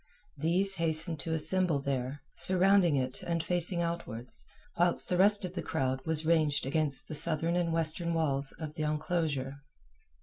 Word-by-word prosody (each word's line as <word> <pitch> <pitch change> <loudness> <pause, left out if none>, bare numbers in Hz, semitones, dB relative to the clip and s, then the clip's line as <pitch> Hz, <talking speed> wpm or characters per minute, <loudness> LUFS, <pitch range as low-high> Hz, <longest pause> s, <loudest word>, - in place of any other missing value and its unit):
These 180 +6 0
hastened 160 -1 -2
to 160 +3 -4
assemble 180 0 +1
there, 135 0 -4
surrounding 185 -3 +2
it 130 -1 -2
and 170 -1 -3
facing 175 0 +1
outwards, 130 -9 -5 0.3
whilst 175 0 +1
the 180 - +1
rest 205 +1 +8
of 180 - -7
the 175 - -4
crowd 130 -3 -3
was 160 -1 +5
ranged 155 -4 +1
against 145 0 -2
the - - -7
southern 165 +2 +1
and 175 -2 -1
western 165 +1 -1
walls 140 -4 -1
of 155 -2 -8
the 155 - -7
enclosure. 150 -3 -3
160 Hz, 160 wpm, -30 LUFS, 145-175 Hz, 0.3 s, rest